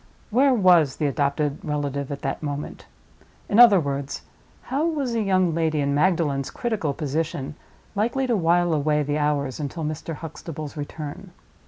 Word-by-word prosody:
Where 265 +5 +4
was 175 - +5
the 155 - -2
adopted 145 0 0
relative 145 -2 -2
at 140 - -6
that 135 - -2
moment? 145 -1 -5 0.6
In 205 - +2
other 230 -6 +9
words, 140 -2 -3 0.4
how 285 +5 0
was 285 -7 -1
a 230 - +1
young 185 -4 +2
lady 160 -2 0
in 140 0 +1
Magdalen's 150 -4 +1
critical 215 -11 -2
position 150 -1 -3 0.4
likely 235 +6 0
to 245 -2 +1
while 175 -2 +2
away 150 0 +1
the 145 +1 -1
hours 145 -2 0
until 155 +3 -4
Mr. 155 +1 -4
Huxtable 155 -1 -7
's - - -17
return? 150 +4 -7
155 Hz, 160 wpm, -24 LUFS, 145-185 Hz, 0.6 s, other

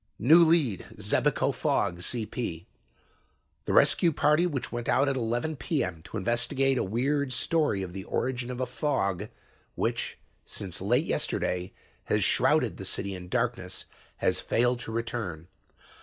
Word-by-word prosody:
"New 160 - +7
Lead 155 - +2
Xebico - - +1
Fog 85 - 0
CP 105 -4 -3 1.0
"The - - -1
rescue 170 - +5
party 155 +3 +3
which 140 -7 -4
went 120 0 -3
out 140 +2 +3
at 135 - +1
11 120 +6 -1
P.M. 105 - -2
to - - -6
investigate 125 +5 +1
a - - +1
weird 135 +7 0
story 125 -4 +1
of 90 -2 -7
the 95 0 -5
origin 125 -1 -2
of 125 -1 -5
a 130 - +1
fog 105 - -1 0.5
which, - - -2 0.3
since 95 -3 -5
late 120 - +2
yesterday, 90 - -1 0.3
has - - +1
shrouded - - +2
the - - -7
city 100 - -2
in 90 -1 -8
darkness 115 -5 -2 0.3
has - - +1
failed 120 +1 +1
to 115 - -6
return. 110 -8 -4
120 Hz, 145 wpm, -28 LUFS, 95-135 Hz, 1.0 s, New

